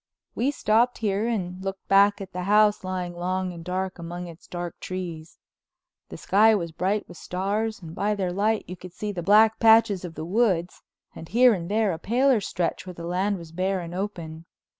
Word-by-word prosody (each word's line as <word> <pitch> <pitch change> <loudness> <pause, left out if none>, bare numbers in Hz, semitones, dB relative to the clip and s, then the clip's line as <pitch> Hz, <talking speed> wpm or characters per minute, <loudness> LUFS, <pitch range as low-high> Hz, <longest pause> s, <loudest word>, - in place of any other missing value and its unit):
We 250 +4 0
stopped 240 -3 +2
here 210 0 0
and 185 -5 -3
looked 195 0 -5
back 200 +1 +4
at 190 -1 -8
the 180 - -3
house 210 0 +4
lying 185 -1 -3
long 185 +1 -2
and 170 -1 -9
dark 185 +1 -3
among 175 +1 -6
its 170 0 -12
dark 175 -1 -6
trees. 170 -3 -6 0.7
The - - -8
sky 220 +3 +4
was 170 -5 -3
bright 190 +5 -1
with 175 - -12
stars 205 +4 -2
and 160 -1 -8
by 210 +4 0
their 185 -3 -2
light 210 +3 0
you 180 - -6
could 180 0 -12
see 210 +2 -4
the 180 -3 -5
black 215 +4 +5
patches 220 -4 +5
of 170 -3 -7
the 155 - -5
woods 185 -3 0 0.3
and 160 - -10
here 245 +2 +5
and 170 -3 -4
there 210 -2 +1
a 160 - -6
paler 245 +1 +2
stretch 180 -1 -3
where 180 - -7
the 170 - -7
land 190 +4 0
was 165 -2 -11
bare 185 +3 -1
and 170 -1 -7
open. 170 -4 -5
190 Hz, 205 wpm, -25 LUFS, 175-210 Hz, 0.7 s, black